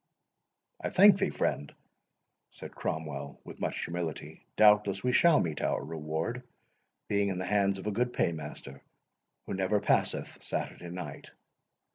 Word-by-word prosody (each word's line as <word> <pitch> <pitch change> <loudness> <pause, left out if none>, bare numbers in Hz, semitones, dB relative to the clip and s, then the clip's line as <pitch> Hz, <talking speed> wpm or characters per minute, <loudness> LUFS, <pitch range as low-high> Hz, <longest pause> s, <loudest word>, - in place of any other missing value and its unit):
"I - - 0
thank 195 0 +7
thee, 195 - +1
friend," 70 - -2 0.8
said - - -10
Cromwell, 70 -3 -4
with - - -11
much - - -2
humility; 85 -2 -5
"doubtless 105 -2 +4
we 125 - +2
shall 165 +4 +5
meet 80 -4 -2
our - - 0
reward, 80 +9 -3 0.7
being 100 -1 +1
in 95 - -2
the 95 - -3
hands 100 0 +2
of 95 - -9
a 105 - 0
good 120 +4 0
paymaster, 75 - -3 0.6
who - - -5
never 95 +2 +1
passeth 100 - 0
Saturday 90 - -4
night. 85 -5 -7
95 Hz, 140 wpm, -30 LUFS, 80-105 Hz, 0.8 s, thank